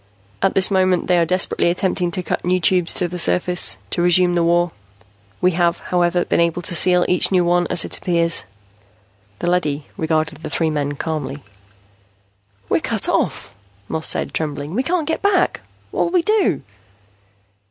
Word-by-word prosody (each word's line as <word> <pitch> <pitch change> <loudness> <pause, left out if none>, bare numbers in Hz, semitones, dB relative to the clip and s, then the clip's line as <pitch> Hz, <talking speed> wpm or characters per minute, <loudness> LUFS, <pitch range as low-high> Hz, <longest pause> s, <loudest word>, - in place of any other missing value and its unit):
At 195 - +1
this 190 +1 +3
moment 185 -2 +2
they 180 -1 +2
are 165 - +1
desperately 185 -1 0
attempting 180 0 -1
to 185 +1 -4
cut - - -3
new 185 +1 +1
Tubes 180 0 +2
to 180 - -1
the 180 +1 -6
surface, 180 +1 +1
to - - -1
resume 175 0 +4
the 175 - +1
war. 175 0 +2 0.7
We 180 - +3
have, 170 0 +1
however, 175 0 0
been - - 0
able 170 +1 0
to - - 0
seal 180 +1 +4
each 180 - +3
new 180 -2 +3
one 175 0 +2
as - - 0
it - - -4
appears." 170 -2 0 0.9
The 175 - -1
leady 150 -5 -1
regarded 160 -1 -1
the - - -6
three 160 +2 -1
men 145 -1 -2
calmly. 150 -2 -4 1.2
"We're - - +1
cut - - 0
off," - - -1 0.3
Moss 160 +6 -1
said, - - 0
trembling. 150 0 -4
"We 240 - +1
can't 330 +2 -1
get 320 - -2
back. 380 -3 +1 0.3
What'll - - 0
we 355 -2 +2
do?" 420 - +1
175 Hz, 175 wpm, -19 LUFS, 165-185 Hz, 1.2 s, resume